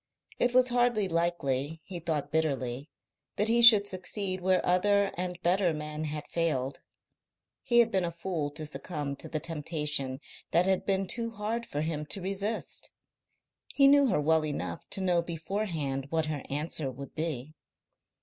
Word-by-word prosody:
It 245 Hz, 0 st, +2 dB
was 255 Hz, 0 st, +5 dB
hardly 240 Hz, -4 st, +2 dB
likely, 165 Hz, -4 st, -1 dB
he 180 Hz, 0 st, -7 dB
thought 155 Hz, -3 st, -2 dB
bitterly, 140 Hz, -3 st, -1 dB, 0.5 s
that 210 Hz, +2 st, +1 dB
he 235 Hz, +1 st, +4 dB
should 220 Hz, -4 st, +9 dB
succeed 185 Hz, 0 st, -3 dB
where 185 Hz, 0 st, +2 dB
other 200 Hz, +2 st, +3 dB
and 180 Hz, 0 st, -4 dB
better 180 Hz, 0 st, +3 dB
men 150 Hz, 0 st, -4 dB
had 150 Hz, 0 st, -5 dB
failed. 145 Hz, -6 st, -1 dB, 0.8 s
He 240 Hz, -3 st, +1 dB
had 230 Hz, -1 st, +1 dB
been 190 Hz, -1 st, +1 dB
a 170 Hz, -, 0 dB
fool 170 Hz, -3 st, -3 dB
to 155 Hz, 0 st, -5 dB
succumb 150 Hz, -2 st, -4 dB
to -, -, -8 dB
the 155 Hz, -, -2 dB
temptation 150 Hz, -4 st, -2 dB, 0.3 s
that 170 Hz, +2 st, +3 dB
had 190 Hz, -1 st, +1 dB
been 195 Hz, -1 st, +1 dB
too 230 Hz, +4 st, -2 dB
hard 225 Hz, +2 st, -3 dB
for 145 Hz, -, -3 dB
him 155 Hz, -1 st, -3 dB
to 195 Hz, -, -2 dB
resist. 195 Hz, +4 st, -3 dB, 0.9 s
He 275 Hz, -1 st, +6 dB
knew 280 Hz, 0 st, +6 dB
her 190 Hz, -9 st, +2 dB
well 160 Hz, +1 st, +3 dB
enough 90 Hz, -, -4 dB
to 195 Hz, -, +3 dB
know 180 Hz, -2 st, +2 dB
beforehand 165 Hz, -5 st, -3 dB
what 160 Hz, 0 st, 0 dB
her 155 Hz, -2 st, -3 dB
answer 150 Hz, 0 st, -2 dB
would 135 Hz, +2 st, -9 dB
be. 155 Hz, -3 st, -3 dB
170 Hz, 165 wpm, -29 LUFS, 150-195 Hz, 0.9 s, should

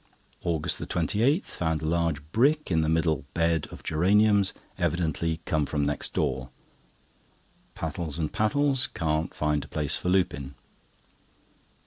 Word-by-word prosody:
AUGUST 80 Hz, -3 st, -1 dB
28.—Found 90 Hz, -, 0 dB
a -, -, -1 dB
large 80 Hz, -2 st, 0 dB
brick 145 Hz, -, +2 dB
in 80 Hz, -2 st, +3 dB
the 80 Hz, -, +1 dB
middle 80 Hz, -1 st, +1 dB
bed 85 Hz, -2 st, +1 dB
of -, -, -11 dB
geraniums, 100 Hz, +4 st, +3 dB, 0.3 s
evidently 80 Hz, -1 st, 0 dB
come 80 Hz, -5 st, 0 dB
from 75 Hz, +1 st, 0 dB
next 75 Hz, 0 st, -2 dB
door. 65 Hz, -1 st, -1 dB, 1.3 s
Pattles 80 Hz, -1 st, -4 dB
and 80 Hz, -2 st, -2 dB
Pattles 135 Hz, +3 st, +2 dB
can't 80 Hz, -2 st, -2 dB
find 75 Hz, -1 st, 0 dB
a -, -, -11 dB
place 75 Hz, -2 st, +1 dB
for 90 Hz, -, -2 dB
Lupin. 70 Hz, -7 st, 0 dB
80 Hz, 125 wpm, -27 LUFS, 75-95 Hz, 1.3 s, in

